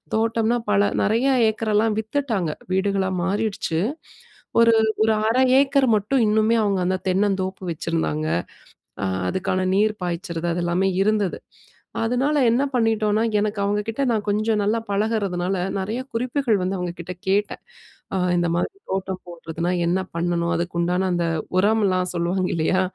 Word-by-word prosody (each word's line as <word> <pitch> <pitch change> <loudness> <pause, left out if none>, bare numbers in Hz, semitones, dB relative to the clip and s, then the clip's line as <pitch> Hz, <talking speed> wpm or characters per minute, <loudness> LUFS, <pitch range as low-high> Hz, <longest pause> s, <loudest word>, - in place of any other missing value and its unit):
தோட்டம்னா 225 +1 +1
பல 205 0 +3
நெறைய 230 +6 +2 0.2
ஏக்கரல்லாம் 215 0 0
வித்துட்டாங்க. 220 - -1 0.2
வீடுகளா 190 0 +1
மாறிடுச்சு. 195 -4 -1 0.8
ஒரு, 230 0 +6 0.3
ஒரு 220 0 +3
1/2 250 +3 +3 0.2
ஏக்கர் 275 -1 +3
மட்டும் 220 +5 +1
இன்னுமே 215 +2 +3
அவுங்க 200 -2 +1
அந்த 185 +1 +1
தென்னந்தோப்பு 190 0 0
வச்சிருந்தாங்க. 80 - -2 0.8
அ - - +1 0.2
அதுக்கான 185 - -1
நீர் 215 +2 +3
பாய்ச்சறது 170 -1 -3
அதெல்லாமே 175 +2 0
இருந்தது. 210 -2 +1 0.7
அதனால 255 +6 +1
என்ன 245 +4 +2
பண்ணிட்டோன்னா, 220 -2 +2 0.2
எனக்கு 210 0 -1
அவுங்கக்கிட்ட 210 +5 -1
நான் 215 -2 -1
கொஞ்சம் 215 +1 +1
நல்லா 220 +3 +1
பழகுறதுனால, 200 -3 0 0.2
நெறைய 220 +7 -3
குறிப்புகள் 240 -2 0
வந்து 190 +1 -1
அவுங்கக்கிட்ட 175 0 -5
கேட்டேன். 205 +2 0 0.5
அ - - +1 0.2
"இந்தமாரி 175 0 0 0.2
தோட்டம் 190 -1 -3
போடுறதுனா 170 0 -4 0.2
என்ன 180 +2 +1 0.2
பண்ணணும்? 170 0 0
அதுக்கு 170 0 -3
உண்டான 180 +2 +1
அந்த 170 -1 0 0.3
உரம்லாம் 195 -3 +2
சொல்லுவாங்க 180 +2 0
இல்லையா, 175 +4 +1
200 Hz, 130 wpm, -22 LUFS, 180-220 Hz, 0.8 s, ஒரு